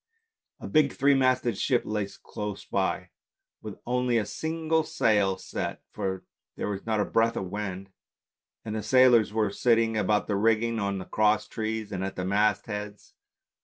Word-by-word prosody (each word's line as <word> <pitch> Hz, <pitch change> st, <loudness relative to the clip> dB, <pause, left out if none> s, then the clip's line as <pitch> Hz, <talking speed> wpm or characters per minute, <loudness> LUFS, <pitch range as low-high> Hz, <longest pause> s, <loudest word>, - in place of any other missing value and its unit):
A -, -, -7 dB
big 150 Hz, -3 st, +3 dB
three 140 Hz, +1 st, +3 dB
masted 130 Hz, -5 st, +2 dB
ship 125 Hz, -3 st, +2 dB
lay 105 Hz, -2 st, -2 dB, 0.2 s
close 105 Hz, -1 st, -6 dB
by -, -, -1 dB, 0.5 s
with -, -, -8 dB
only 125 Hz, -1 st, +1 dB
a 110 Hz, -, 0 dB
single 160 Hz, +5 st, -1 dB
sail 105 Hz, -8 st, +2 dB
set, -, -, -5 dB
for 95 Hz, -1 st, -3 dB, 0.3 s
there -, -, -3 dB
was 100 Hz, +1 st, -5 dB
not 110 Hz, -1 st, +1 dB
a 105 Hz, -, +2 dB
breath 115 Hz, 0 st, +1 dB
of 95 Hz, -1 st, -4 dB
wind, 100 Hz, -2 st, -5 dB, 0.7 s
and 110 Hz, -, -4 dB
the 110 Hz, -, -2 dB
sailors 125 Hz, -3 st, +5 dB
were 105 Hz, -2 st, 0 dB
sitting 115 Hz, 0 st, +2 dB
about 105 Hz, 0 st, +1 dB
the 105 Hz, -, -1 dB
rigging, 115 Hz, +2 st, +2 dB
on 100 Hz, -1 st, -1 dB
the 95 Hz, -, -6 dB
cross 105 Hz, 0 st, +2 dB
trees, 110 Hz, -1 st, -4 dB
and 95 Hz, -1 st, -3 dB
at 95 Hz, -, -4 dB
the 90 Hz, -, -3 dB
mast 105 Hz, +2 st, +2 dB
heads. 105 Hz, -1 st, -7 dB
110 Hz, 170 wpm, -27 LUFS, 100-120 Hz, 0.7 s, sailors